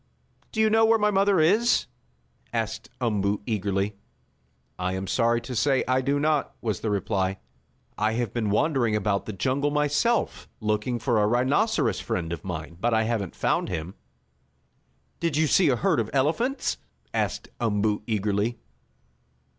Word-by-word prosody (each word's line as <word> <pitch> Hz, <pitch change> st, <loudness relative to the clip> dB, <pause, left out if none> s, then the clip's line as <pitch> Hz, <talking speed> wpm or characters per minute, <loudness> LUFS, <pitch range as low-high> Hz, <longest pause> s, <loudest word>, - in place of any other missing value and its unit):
"Do 220 Hz, -, -4 dB
you 220 Hz, 0 st, +4 dB
know 225 Hz, +1 st, +5 dB
where 225 Hz, 0 st, +5 dB
my 210 Hz, -1 st, +2 dB
mother 195 Hz, -1 st, +3 dB
is?" 210 Hz, +10 st, +3 dB, 0.7 s
asked -, -, -3 dB
Umboo 105 Hz, -4 st, 0 dB
eagerly. 100 Hz, -2 st, -1 dB, 0.8 s
"I 90 Hz, 0 st, -1 dB
am 95 Hz, +1 st, -3 dB
sorry 115 Hz, +4 st, +2 dB
to 125 Hz, +2 st, -6 dB
say 135 Hz, +2 st, +2 dB
I 130 Hz, +1 st, +2 dB
do 140 Hz, +2 st, 0 dB
not," 150 Hz, 0 st, 0 dB
was 110 Hz, -5 st, -2 dB
the 110 Hz, -, -2 dB
reply. 95 Hz, -2 st, 0 dB, 0.6 s
"I 110 Hz, +1 st, +2 dB
have 120 Hz, -3 st, -2 dB
been 115 Hz, -3 st, -1 dB
wandering 120 Hz, -1 st, +2 dB
about 100 Hz, -1 st, 0 dB
the -, -, -2 dB
jungle 130 Hz, +8 st, 0 dB
myself, 150 Hz, +10 st, 0 dB
looking 105 Hz, +3 st, -1 dB
for 120 Hz, -2 st, +1 dB
a 105 Hz, -, +3 dB
rhinoceros 130 Hz, -, +2 dB
friend 85 Hz, -1 st, -3 dB
of 85 Hz, -, -6 dB
mine, 85 Hz, -2 st, -6 dB
but 120 Hz, -1 st, +2 dB
I 110 Hz, -, +3 dB
haven't 110 Hz, -5 st, -2 dB
found -, -, 0 dB
him." 85 Hz, +1 st, -4 dB, 1.3 s
"Did 165 Hz, -4 st, 0 dB
you 160 Hz, -, +4 dB
see 165 Hz, +3 st, +4 dB
a 130 Hz, -, +3 dB
herd 115 Hz, -, +1 dB
of 110 Hz, -1 st, -1 dB
elephants?" 165 Hz, -, 0 dB, 0.4 s
asked -, -, -2 dB
Umboo 105 Hz, -2 st, +1 dB
eagerly. 105 Hz, +1 st, 0 dB
115 Hz, 155 wpm, -26 LUFS, 105-145 Hz, 1.3 s, know